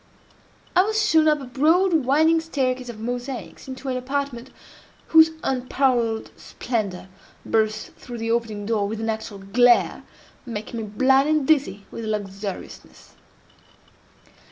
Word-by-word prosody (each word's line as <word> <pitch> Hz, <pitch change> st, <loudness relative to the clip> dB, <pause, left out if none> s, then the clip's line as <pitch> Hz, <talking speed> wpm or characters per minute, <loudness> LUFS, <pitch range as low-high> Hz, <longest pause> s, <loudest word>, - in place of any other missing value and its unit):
I 360 Hz, -, +7 dB
was 430 Hz, +2 st, +1 dB
shown 320 Hz, -5 st, +4 dB
up 300 Hz, -1 st, +3 dB
a -, -, -7 dB
broad 325 Hz, +9 st, +3 dB
winding 315 Hz, +3 st, +3 dB
staircase 255 Hz, -6 st, -2 dB
of 225 Hz, -2 st, -8 dB
mosaics, 245 Hz, +4 st, -5 dB
into 260 Hz, +1 st, -8 dB
an 255 Hz, -1 st, -1 dB
apartment 265 Hz, -1 st, -3 dB, 0.6 s
whose 320 Hz, 0 st, +7 dB
unparalleled 250 Hz, -3 st, 0 dB
splendor 205 Hz, -7 st, -4 dB, 0.4 s
burst 215 Hz, -1 st, 0 dB
through 240 Hz, -1 st, -8 dB
the 225 Hz, 0 st, -2 dB
opening 220 Hz, -3 st, -2 dB
door 210 Hz, -2 st, 0 dB
with 220 Hz, +1 st, -4 dB
an 225 Hz, 0 st, -1 dB
actual 220 Hz, -2 st, -6 dB
glare, 240 Hz, +5 st, +3 dB, 0.4 s
making 230 Hz, -1 st, -6 dB
me 220 Hz, -, -5 dB
blind 265 Hz, +7 st, +3 dB
and 305 Hz, -3 st, +1 dB
dizzy 265 Hz, -11 st, +1 dB
with 230 Hz, -, -6 dB
luxuriousness. 200 Hz, -2 st, -6 dB
245 Hz, 130 wpm, -23 LUFS, 220-280 Hz, 0.6 s, I